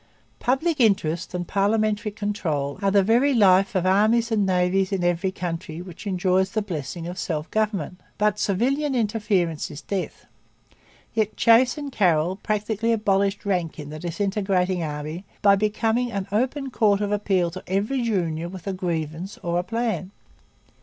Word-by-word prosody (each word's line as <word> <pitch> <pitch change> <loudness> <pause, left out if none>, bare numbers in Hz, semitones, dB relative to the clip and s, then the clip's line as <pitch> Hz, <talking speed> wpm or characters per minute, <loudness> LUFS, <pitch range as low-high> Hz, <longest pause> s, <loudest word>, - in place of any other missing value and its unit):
Public 285 +5 0
interest 185 -6 +1
and 175 -1 -3
parliamentary 210 +1 +1
control 180 -9 -2
are 200 - +2
the 195 0 +4
very 245 +7 +3
life 195 0 +4
of 185 -1 +1
armies 220 +5 +3
and 205 -3 +2
navies 185 +1 +1
in 190 -2 -1
every 175 +2 +1
country 165 -3 -5
which 180 +3 -9
enjoys 185 0 +1
the 215 -2 0
blessings 165 -2 -5
of 180 +1 -6
self 155 -2 -3
government. 200 -6 -1 0.2
But 210 0 +1
civilian 265 +9 +1
interference 205 -8 0
is 150 +1 -9
death. 195 -2 -4 0.9
Yet 215 -2 -1
Chase 240 +5 +5
and 290 -2 -5
Carroll 180 -4 +2
practically 215 +2 -1
abolished 200 -2 +1
rank 180 -5 -1
in 150 -2 -7
the 155 - -7
disintegrating 185 +1 0
army 155 +3 -4 0.2
by 200 -1 +7
becoming 220 +4 0
an 200 -3 -3
open 260 +5 -1
court 210 -5 +3
of 205 0 -1
appeal 190 -4 +1
to 185 +2 -8
every 205 +8 0
junior 170 -7 -1
with 185 -1 -9
a 195 - -2
grievance 170 0 -3
or 175 0 0
a - - -1
plan. 215 -3 -2
195 Hz, 160 wpm, -24 LUFS, 175-215 Hz, 0.9 s, by